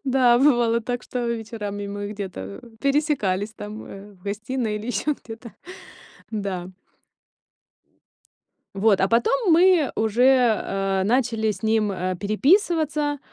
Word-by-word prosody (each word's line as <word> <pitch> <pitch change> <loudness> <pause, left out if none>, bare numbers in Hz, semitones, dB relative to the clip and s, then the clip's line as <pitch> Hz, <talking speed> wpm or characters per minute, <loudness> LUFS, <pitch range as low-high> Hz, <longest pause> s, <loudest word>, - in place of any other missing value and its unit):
да, 255 -3 +4
бывало 240 -4 +3
так, 245 +2 -4
что 245 -1 -4
вечерами 220 -3 -4
мы 205 +1 -5
где-то, 180 - -7 0.2
пересекались 275 - 0
там, 210 0 -8
э, 200 +1 -11
в 180 - -23
гостиной 220 +3 -3
или 210 +2 -7
ещё 295 +4 -1
где-то. 225 -1 -11 0.8
Да. 190 -4 -4 2.1
Вот, 200 0 +3
а 190 - +3
потом 365 - +2
мы 345 -2 +5
уже, 245 +3 +4
а, 195 -1 -1
начали 225 -1 +1
с 190 -2 -9
ним, 220 -1 +1
а, 185 -1 -2
переписываться. 295 - +1
225 Hz, 120 wpm, -23 LUFS, 200-260 Hz, 2.1 s, мы